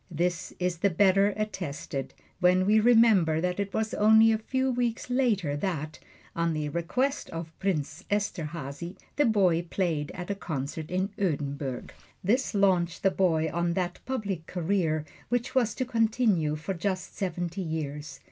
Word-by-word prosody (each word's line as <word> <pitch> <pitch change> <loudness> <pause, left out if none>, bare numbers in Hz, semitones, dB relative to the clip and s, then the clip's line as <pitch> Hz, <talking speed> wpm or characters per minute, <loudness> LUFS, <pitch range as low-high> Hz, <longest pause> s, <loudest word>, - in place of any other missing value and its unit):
This 175 +1 -1
is 180 -1 -1
the 200 - +3
better 195 +2 +4
attested 175 -10 -4 0.2
when 185 0 +4
we 215 +2 +5
remember 215 -9 +5
that 180 +2 -1
it 200 -1 -2
was 220 +1 -1
only 220 +1 +6
a 220 - +1
few 260 +4 0
weeks 245 0 -2
later 215 - +1
that, 155 -2 -3 0.4
on 170 -1 +1
the 150 -1 -2
request 250 - -1
of 165 0 -6
Prince 175 -7 -2
Esterhazy, 170 -4 -3 0.2
the 290 -3 +4
boy 185 -6 +3
played 165 -4 -1
at 180 +2 -4
a - - +1
concert 155 -4 -5
in 185 +2 0
Oedenburg. 140 -7 -2 0.3
This 235 +5 +1
launched 180 -4 +2
the 195 - +4
boy 160 -5 +1
on 170 0 0
that 180 -1 -2
public 205 -10 -3
career 170 -3 0 0.2
which 245 0 -1
was 240 -5 +2
to 255 - -1
continue 225 -9 +2
for 155 +5 -4
just 185 0 -3
seventy 175 0 -3
years. 155 -3 -4
180 Hz, 155 wpm, -28 LUFS, 160-210 Hz, 0.4 s, only